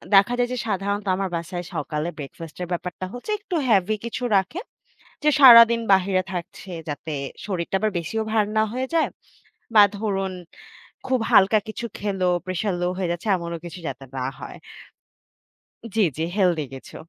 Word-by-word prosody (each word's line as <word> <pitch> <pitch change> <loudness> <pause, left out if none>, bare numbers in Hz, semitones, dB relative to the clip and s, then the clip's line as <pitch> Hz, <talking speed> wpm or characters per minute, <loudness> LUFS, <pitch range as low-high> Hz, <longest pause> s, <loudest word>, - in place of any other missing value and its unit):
দেখা 200 +5 +6
যায় 245 0 +2
যে - - -3
সাধারণত 200 0 -1
আমার 195 0 -2
বাসায় 175 +1 -4
সকালে 150 +1 -2
ব্রেকফাস্ট 155 +2 -9
এর 180 - -3
ব্যাপারটা 180 +1 -4
হচ্ছে 245 - -6
একটু 405 -3 -5
হ্যাবি 210 -2 +3
কিছু 235 +2 -4
রাখে। 195 - 0 0.6
যে 300 - +5
সারাদিন 235 -3 +9
বাহিরে 190 0 +2
থাকছে 180 +1 -7 0.2
যাতে 150 +2 -5 0.3
শরীরটা 185 -2 -2
আবার 215 +1 0
বেশিও 220 +7 -3
ভার 215 -1 +3
না 215 - +5
হয়ে 260 +1 -2
যায়। 325 - +3 0.7
বা, 210 - +10 0.2
ধরুন 195 -3 -2 0.7
খুব 260 -1 +2
হালকা 200 +3 +6
কিছু 225 +2 -5
খেলো, 195 -3 -1 0.2
প্রেশার 185 +2 -1
লো 175 - +1
হয়ে 180 -3 -1
যাচ্ছে 175 +5 -5
এমনও 170 -1 -5
কিছু 175 +1 -8
যাতে 135 - -7
না 130 - -2
হয়। - - -9 1.4
জি, 220 - +4
জি, 160 - -1
healthy 175 -6 +2
কিছু। 135 - -12
195 Hz, 160 wpm, -23 LUFS, 175-220 Hz, 1.4 s, বা